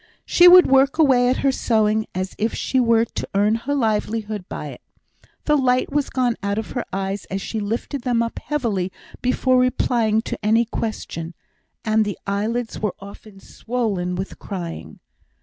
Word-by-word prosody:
She 350 Hz, -, +6 dB
would 360 Hz, 0 st, +9 dB
work 270 Hz, +2 st, +3 dB
away 260 Hz, -6 st, +4 dB
at 255 Hz, -, +1 dB
her 275 Hz, -, +5 dB
sewing 220 Hz, -3 st, +1 dB
as 185 Hz, +1 st, -3 dB
if 220 Hz, +1 st, 0 dB
she 260 Hz, -, 0 dB
were 230 Hz, -2 st, +3 dB
to -, -, -6 dB
earn 205 Hz, +2 st, +3 dB
her 245 Hz, +6 st, -2 dB
livelihood 215 Hz, -4 st, -2 dB
by -, -, -5 dB
it; -, -, -11 dB, 0.6 s
the 300 Hz, -, +3 dB
light 255 Hz, -2 st, +1 dB
was 290 Hz, -1 st, 0 dB
gone 245 Hz, -3 st, 0 dB
out 200 Hz, 0 st, -2 dB
of 220 Hz, -, -4 dB
her 245 Hz, -, -2 dB
eyes 195 Hz, +1 st, -3 dB
as 195 Hz, -, -4 dB
she 220 Hz, +3 st, -4 dB
lifted 230 Hz, +6 st, -3 dB
them 240 Hz, -2 st, +1 dB
up 230 Hz, -, -5 dB
heavily 215 Hz, -11 st, -2 dB, 0.3 s
before 255 Hz, 0 st, +2 dB
replying 230 Hz, -3 st, +1 dB
to -, -, -6 dB
any 225 Hz, +3 st, +3 dB
question, 175 Hz, -7 st, -5 dB, 0.5 s
and 220 Hz, 0 st, +3 dB
the 205 Hz, -2 st, -4 dB
eyelids 220 Hz, +4 st, -2 dB
were 210 Hz, -3 st, -2 dB
often 200 Hz, 0 st, -12 dB
swollen 205 Hz, -7 st, -3 dB
with 190 Hz, +2 st, -6 dB
crying. 175 Hz, -5 st, -7 dB
225 Hz, 170 wpm, -21 LUFS, 205-250 Hz, 0.6 s, would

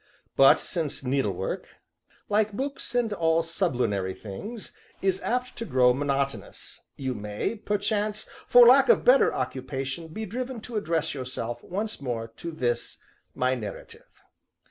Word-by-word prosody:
But 135 Hz, 0 st, +7 dB
since 160 Hz, -6 st, -3 dB
needlework 115 Hz, -8 st, -1 dB, 0.6 s
(like 210 Hz, 0 st, +2 dB
books 270 Hz, +1 st, -4 dB
and 235 Hz, -3 st, +1 dB
all 165 Hz, -3 st, +2 dB
sublunary 125 Hz, -, 0 dB
things) 205 Hz, -, -7 dB, 0.3 s
is 190 Hz, 0 st, 0 dB
apt 250 Hz, +1 st, -2 dB
to -, -, -3 dB
grow 125 Hz, -, +4 dB
monotonous, 140 Hz, -5 st, -3 dB
you 130 Hz, -2 st, -3 dB
may, 105 Hz, -, -3 dB
perchance, 210 Hz, 0 st, -1 dB, 0.2 s
for 245 Hz, 0 st, +8 dB
lack 265 Hz, +3 st, +7 dB
of -, -, +5 dB
better 260 Hz, +2 st, +6 dB
occupation, 135 Hz, +4 st, -4 dB
be 215 Hz, +8 st, -5 dB
driven 250 Hz, +4 st, -4 dB
to 235 Hz, +1 st, -8 dB
address 165 Hz, -6 st, 0 dB
yourself, 120 Hz, -3 st, -5 dB
once 210 Hz, -1 st, -4 dB
more, 120 Hz, -4 st, -3 dB
to 170 Hz, -, -5 dB
this, 120 Hz, -7 st, -2 dB, 0.4 s
my 130 Hz, 0 st, +1 dB
Narrative. 110 Hz, -6 st, -8 dB
160 Hz, 135 wpm, -27 LUFS, -, 0.6 s, for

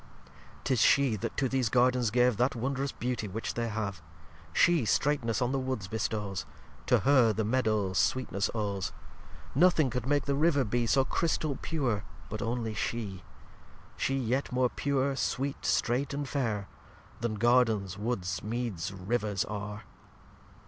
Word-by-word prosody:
lxxxvii -, -, -23 dB
'Tis 130 Hz, -3 st, +1 dB
She 135 Hz, -3 st, +4 dB
that -, -, -5 dB
to 135 Hz, -, +2 dB
these 130 Hz, -2 st, 0 dB
Gardens 125 Hz, -1 st, +3 dB
gave 125 Hz, 0 st, +3 dB
That 125 Hz, +4 st, +2 dB
wondrous 135 Hz, +3 st, -2 dB
Beauty 120 Hz, -3 st, -3 dB
which 110 Hz, +4 st, -4 dB
they 115 Hz, 0 st, -2 dB
have; 105 Hz, -4 st, -3 dB, 0.5 s
She 170 Hz, -, +4 dB
streightness 120 Hz, 0 st, +1 dB
on 125 Hz, -, 0 dB
the 135 Hz, -, 0 dB
Woods 130 Hz, -7 st, -3 dB
bestows; 105 Hz, -2 st, -3 dB, 0.4 s
To -, -, +4 dB
Her 130 Hz, -5 st, +5 dB
the 110 Hz, -, -1 dB
Meadow 110 Hz, -5 st, +1 dB
sweetness 100 Hz, -1 st, +1 dB
owes; 100 Hz, -3 st, -2 dB, 0.6 s
Nothing 155 Hz, -3 st, +4 dB
could 125 Hz, +1 st, -3 dB
make 145 Hz, 0 st, +2 dB
the 140 Hz, -, 0 dB
River 145 Hz, -1 st, +3 dB
be 120 Hz, +1 st, 0 dB
So 135 Hz, +3 st, +3 dB
Chrystal 155 Hz, -1 st, 0 dB
pure 130 Hz, -, -1 dB, 0.3 s
but -, -, -4 dB
only 115 Hz, -1 st, -2 dB
She; 105 Hz, -3 st, -3 dB, 0.7 s
She 135 Hz, -, 0 dB
yet 130 Hz, +2 st, -1 dB
more 125 Hz, 0 st, +2 dB
Pure, 140 Hz, 0 st, 0 dB
Sweet, 140 Hz, +1 st, -1 dB
Streight, 130 Hz, +4 st, +1 dB
and 145 Hz, -1 st, -3 dB
Fair, 115 Hz, -8 st, -1 dB, 0.5 s
Then 115 Hz, -2 st, -2 dB
Gardens, 110 Hz, -4 st, +2 dB
Woods, 105 Hz, -4 st, -2 dB
Meads, 110 Hz, -6 st, -3 dB
Rivers 100 Hz, +1 st, -1 dB
are. 105 Hz, +1 st, -5 dB
120 Hz, 150 wpm, -30 LUFS, 105-135 Hz, 0.7 s, Her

